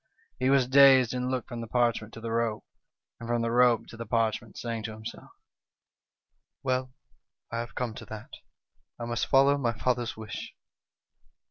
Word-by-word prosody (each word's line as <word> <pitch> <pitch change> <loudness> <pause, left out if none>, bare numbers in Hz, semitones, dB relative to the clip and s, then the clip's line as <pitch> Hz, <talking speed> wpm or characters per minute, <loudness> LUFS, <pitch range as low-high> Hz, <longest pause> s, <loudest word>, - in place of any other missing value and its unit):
" - - -38
He 130 - +2
was 135 -2 +4
dazed, 130 -2 +7
and 125 0 -2
looked 130 -1 -2
from 120 -2 -5
the 115 - -6
parchment 115 -2 +1
to - - -8
the 115 0 -4
rope, 115 -2 -1 0.5
and 115 - -8
from 120 -1 +1
the 115 - 0
rope 120 -1 +4
to 115 - -11
the 115 - -7
parchment, 115 -1 -1
saying 115 -2 -3
to 110 - -5
himself: 110 +1 -9 1.3
'Well, 130 -1 -1 0.6
I 115 - -2
have 120 0 -6
come 120 -3 -2
to - - -9
that, 110 -1 -9 0.7
I 120 - -4
must 120 0 -1
follow 140 +1 +4
my 120 -3 0
father's 120 -2 -1
wish.' 110 -1 -7
120 Hz, 175 wpm, -28 LUFS, 115-125 Hz, 1.3 s, dazed